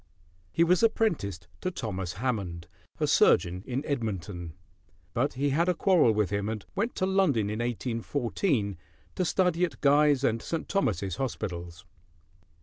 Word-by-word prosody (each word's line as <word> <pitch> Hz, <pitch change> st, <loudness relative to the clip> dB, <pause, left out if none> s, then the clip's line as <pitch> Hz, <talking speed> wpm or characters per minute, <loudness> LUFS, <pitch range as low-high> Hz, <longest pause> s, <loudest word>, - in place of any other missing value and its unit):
He 165 Hz, -, +3 dB
was 175 Hz, +1 st, +3 dB
apprenticed 190 Hz, -, +1 dB
to 185 Hz, -, -1 dB
Thomas 95 Hz, -, -4 dB
Hammond, 95 Hz, -7 st, -3 dB, 0.3 s
a -, -, +2 dB
surgeon 90 Hz, +2 st, +3 dB
in 135 Hz, +3 st, -2 dB
Edmonton; 100 Hz, -, -3 dB, 0.6 s
but 125 Hz, +5 st, 0 dB
he 140 Hz, +2 st, 0 dB
had 170 Hz, +6 st, +2 dB
a 180 Hz, -, +2 dB
quarrel 180 Hz, -, +4 dB
with 105 Hz, -3 st, 0 dB
him, 100 Hz, +1 st, -1 dB
and 110 Hz, -2 st, -5 dB
went 210 Hz, +5 st, -1 dB
to 185 Hz, -, 0 dB
London 175 Hz, -, +2 dB
in 110 Hz, -, -3 dB
1814 120 Hz, -, -1 dB, 0.3 s
to 185 Hz, -, -1 dB
study 180 Hz, 0 st, +1 dB
at 155 Hz, -9 st, -1 dB
Guy's 145 Hz, -1 st, +4 dB
and 115 Hz, -3 st, +1 dB
St. 165 Hz, -2 st, -4 dB
Thomas's 100 Hz, -, 0 dB
hospitals. 85 Hz, -9 st, -4 dB
120 Hz, 145 wpm, -28 LUFS, 100-165 Hz, 0.6 s, quarrel